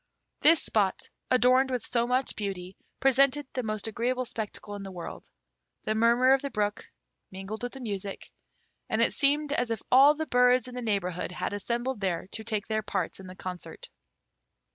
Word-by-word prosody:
This 325 +1 +6
spot, 200 -4 +1 0.3
adorned 255 +2 +4
with 250 -3 -2
so 235 -1 0
much 255 +2 0
beauty, 190 -3 -5 0.2
presented 275 +2 +3
the 255 - -1
most 215 -3 -3
agreeable 245 +3 -1
spectacle 215 -2 -5
in 205 - -6
the 195 - -7
world. 175 -2 -7 0.6
The 215 - 0
murmur 235 +4 +4
of 270 - +2
the 280 - -3
brook 210 -4 -2 0.4
mingled 195 +3 -7
with 245 0 -4
the 270 - -8
music, 200 -4 -5 0.6
and - - 0
it - - +3
seemed 290 +1 +2
as 245 -4 0
if 225 -3 -3
all 275 +4 +7
the 315 +1 -3
birds 250 -2 +3
in 250 - -9
the 250 - -5
neighbourhood 185 -6 -2
had - - -3
assembled 235 +3 -2
there 185 -3 -1
to 220 - -3
take 215 -2 -2
their 215 -1 -1
parts 195 -4 -3
in 190 - -10
the 185 - -10
concert. 180 -1 -8
230 Hz, 185 wpm, -28 LUFS, 200-255 Hz, 0.6 s, all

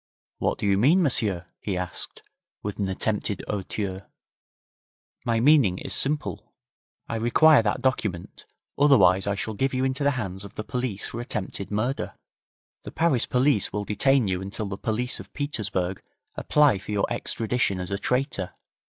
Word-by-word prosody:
'What - - 0
do - - -3
you 100 -1 +3
mean, 160 - +5
m'sieur?' 105 - +2
he 95 -3 -3
asked, 90 -1 -5 0.4
with 105 0 -5
an 100 -2 0
attempted 105 +1 -1
hauteur. 95 -1 -4 1.2
'My 115 -1 +1
meaning 125 -8 +5
is - - -3
simple. 135 - -1 0.5
I 115 - -3
require 140 +6 +5
that 105 +3 -1
document, 105 -9 -2 0.3
otherwise 100 -10 +5
I 100 - +1
shall 110 +2 -4
give 135 +5 -1
you 130 +1 +1
into 135 +2 0
the 140 -2 +2
hands 95 -4 -4
of 100 0 -11
the 110 - -4
police 125 -4 -3
for 120 - -4
attempted 105 -4 -4
murder. 120 +7 -2 0.7
The - - -7
Paris 160 -8 +1
police 125 -4 +2
will 105 +1 -3
detain 130 +3 +2
you 90 -1 -1
until 100 +3 -4
the 100 -1 -4
police 115 +5 -1
of - - -11
Petersburg 100 -10 -2 0.3
apply 145 -9 +3
for 105 - -8
your 100 -1 +1
extradition 115 -4 -1
as 90 +1 -5
a 100 - -1
traitor. 125 -8 -1
110 Hz, 160 wpm, -25 LUFS, 100-130 Hz, 1.2 s, mean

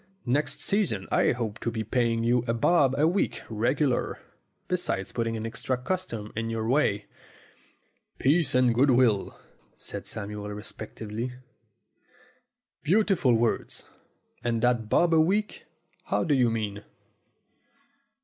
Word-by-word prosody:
Next 140 +3 0
season 175 - 0
I - - +3
hope 115 -3 -3
to - - -2
be 115 -1 -3
paying 115 0 0
you 120 +1 +2
a 115 - +1
bob 135 +1 +3
a 150 +2 +4
week 185 +4 0
regular, 125 +5 0 0.5
besides 95 0 -2
putting 115 -1 -2
extra 125 +3 -2
custom 125 - -4
in 115 +1 -2
your 110 -1 -2
way." 115 -6 +2 1.1
"Peace 155 +1 +2
and 125 -2 +4
good 130 +5 +3
will," 120 -6 +2 0.4
said - - -6
Samuel 105 0 -5
reflectively. 110 +3 -6 1.5
"Beautiful 185 - +3
words! 115 0 -1 0.6
And 115 -1 -1
that 120 -3 +2
bob 170 +6 +3
a 160 - +6
week? 205 +6 0 0.4
How - - 0
do 160 - +1
you 125 -3 +4
mean?" 105 -2 -3
120 Hz, 125 wpm, -27 LUFS, 110-140 Hz, 1.5 s, a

